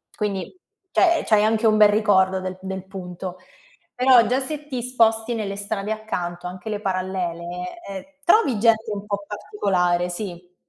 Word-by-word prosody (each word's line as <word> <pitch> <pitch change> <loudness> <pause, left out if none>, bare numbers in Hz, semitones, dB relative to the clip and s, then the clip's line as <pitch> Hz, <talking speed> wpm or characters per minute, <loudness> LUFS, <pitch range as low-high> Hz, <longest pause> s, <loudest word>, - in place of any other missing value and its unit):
Quindi, 200 - -3 0.4
cioè, 340 -2 +3
c'hai 210 -1 +4
anche 220 +1 +2
un 215 -1 +5
bel 210 -1 +7
ricordo 190 -3 +3
del 185 0 -5
del 190 0 -5
punto. 185 -1 -7 0.6
Però 250 -1 +6
già 255 +4 +2
se 295 +2 -5
ti 255 -4 -3
sposti 230 -2 +2
nelle 210 -3 -3
strade 205 0 -3
accanto, 180 -5 -4
anche 185 +4 -6
le 210 -1 -2
parallele, 185 - -3
eh, 235 +9 -9
trovi 335 - +4
gente 225 -1 +3
un 200 -1 -5
po' 200 -1 -3
particolare, 185 -4 0
sì. 180 -1 -7
205 Hz, 155 wpm, -23 LUFS, 185-225 Hz, 0.6 s, bel